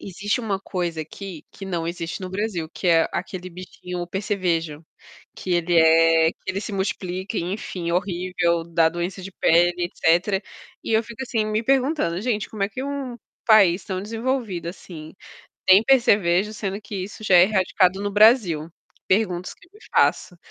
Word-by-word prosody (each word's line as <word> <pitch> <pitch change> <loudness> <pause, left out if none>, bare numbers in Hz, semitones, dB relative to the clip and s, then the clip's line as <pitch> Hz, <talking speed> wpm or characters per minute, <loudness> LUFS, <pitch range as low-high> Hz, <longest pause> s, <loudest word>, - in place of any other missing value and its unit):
existe 205 +5 -3
uma 205 -4 -2
coisa 175 -4 -3
aqui 175 +1 -9
que 195 - -9
não 170 -3 -3
existe 170 +1 -5
no 185 - -5
Brasil, 190 -5 -3
que 180 - -2
é 165 -1 +4
aquele 185 -1 -5
bichinho, 180 0 -8
o - - -5
percevejo, 175 -6 -2 0.5
que 185 - -6
ele 175 0 +1
é 165 0 +5
que - - -44
ele 190 +1 -2
se 215 - -6
multiplica 190 0 -3
e - - -1
enfim, 180 -2 -4
horrível, 175 -2 0
dá 165 -1 +2
doença 175 +3 -4
de 195 +1 -8
pele 175 0 +3
e - - +2
etecétera. 175 +4 +1 0.4
E - - -2
eu 220 +1 +3
fico 235 +3 -8
assim 230 -4 -1
me 215 +1 -1
perguntando: 265 - +1
"Gente, 215 -3 -1
como 210 -3 -5
é - - -2
que 235 +6 -6
um 275 -4 -5 0.3
país 195 -5 +5
tão 185 -1 -4
desenvolvido, 225 -5 -3
assim, 165 -3 -10 0.5
tem 190 +4 +7
percevejo? 210 -6 +3
Sendo 200 -1 -4
que 200 0 -8
isso 205 +2 -11
já 190 -3 +5
é 175 - +8
erradicado 190 -1 +1
no 205 - -2
Brasil?" 205 - +4 0.4
Perguntas 185 -3 0
que 335 - -22
me 420 - -18 0.2
faço, 180 - +2
185 Hz, 175 wpm, -23 LUFS, 170-210 Hz, 0.5 s, é